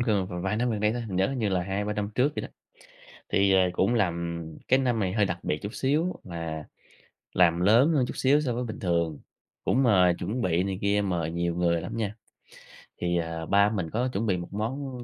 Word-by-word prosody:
gần 105 -6 +1 0.2
vài 95 +2 -1
năm 120 +2 +1
gần 110 -2 -2
đây 105 +1 +2
thôi, 120 +1 -3
nhớ 95 0 +1
hình 135 -1 -3
như 110 -3 +1
là 95 -2 0
2-3 100 +3 -2
năm 105 -1 -3
trước 140 +4 +2
gì - - -2
đó. - - -6 0.8
Thì, 100 0 +3
ờ, 95 - +5
cũng 95 +6 +1
làm 85 -5 -1 0.2
cái 130 - +5
năm 125 -3 +1
này 95 -3 0
hơi 105 0 +2
đặc 85 -3 -2
biệt 75 - -1
chút 100 +3 -5
xíu 155 +7 0
là 85 -3 -5 0.7
làm 85 -2 +4
lớn 115 - +5
hơn 135 -5 +3
chút - - -6
xíu 140 +3 +3
so 130 -5 -1
với 125 - -2
bình 115 -3 -6
thường, 85 -4 0 0.4
cũng 135 - +2
mời 95 -7 +5
chuẩn 105 +8 -2
bị 90 -2 +1
này 95 -1 -2
kia, 100 +1 +2
mời 85 -5 -1
nhiều 85 0 -1
người 85 -1 +1
lắm - - -6
nha. 105 -2 -2 0.9
Thì, 85 0 +1
ờ, 80 -1 -3
ba 100 +3 +4
mình 95 -7 -2
có 120 +7 0
chuẩn 105 +4 -1
bị 95 -4 +1
một 85 +2 -7
món 125 +4 -4
100 Hz, 230 wpm, -27 LUFS, 85-120 Hz, 0.9 s, ờ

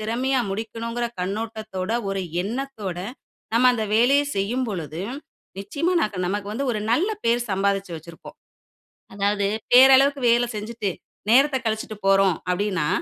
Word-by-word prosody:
திறமையா 250 +4 0
முடிக்கணும்ங்கிற 230 +3 -3
கண்ணோட்டத்தோட, 215 0 -4 0.2
ஒரு 195 -1 -2 0.2
எண்ணத்தோட, 215 -5 -4 0.6
நம்ம 240 +2 +3
அந்த 220 -2 -1
வேலைய 265 +6 +4
செய்யும் 240 +6 -1
பொழுது, 165 -5 -5 0.6
நிச்சயமா 290 - -1
நக் 210 -3 -2
நமக்கு 205 +2 -3
வந்து 270 +4 -2
ஒரு 215 - -2
நல்ல 365 - +2
பேர் 235 +1 +1
சம்பாதிச்சு 195 -1 0
வச்சிருப்போம். 165 +1 -12 0.8
அதாவது, 200 0 +1 0.3
பேரளவுக்கு 270 +2 +7
வேல 240 +1 +3
செஞ்சுட்டு, 210 -2 -3 0.4
நேரத்த 270 +2 +5
கழிச்சிட்டு 220 -1 -3
போறோம் 195 -3 +4
அப்டின்னா, 185 -4 0
215 Hz, 125 wpm, -23 LUFS, 195-245 Hz, 0.8 s, பேரளவுக்கு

